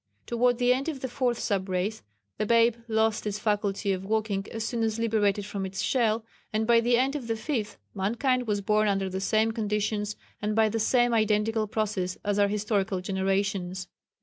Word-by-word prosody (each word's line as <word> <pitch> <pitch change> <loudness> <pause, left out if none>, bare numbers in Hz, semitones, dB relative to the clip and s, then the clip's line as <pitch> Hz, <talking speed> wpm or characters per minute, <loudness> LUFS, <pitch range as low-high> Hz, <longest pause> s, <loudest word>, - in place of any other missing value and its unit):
Toward 245 +1 +2
the 245 0 +4
end 270 +5 -2
of 280 -5 -5
the 260 - -2
fourth 245 -1 0
sub 195 -4 -1
race, 185 +4 -1 0.4
the - - +1
babe 230 0 +4
lost 220 -1 +1
its 205 0 -2
faculty 205 -1 0
of 190 -1 -2
walking 210 -1 -1
as 225 -1 -3
soon 235 0 -2
as 220 -1 0
liberated 210 -3 +1
from 200 -1 -4
its 190 0 -3
shell, 225 -3 +1 0.3
and 215 +1 0
by 235 0 +5
the 240 +1 +3
end 265 +3 +1
of 265 -6 -4
the 225 - 0
fifth, 220 -2 -3 0.2
mankind 240 +5 0
was 205 -1 0
born 210 +2 +2
under 195 -2 0
the 190 +1 -3
same 220 +3 +2
conditions 210 -1 -1 0.3
and 210 +1 -1
by 220 -1 +4
the 225 +2 -2
same 240 +2 +3
identical 215 0 +2
process 205 -4 -2
as 205 0 +1
our 200 - +5
historical 205 -1 0
generations. 190 -1 -1
215 Hz, 195 wpm, -27 LUFS, 200-230 Hz, 0.4 s, by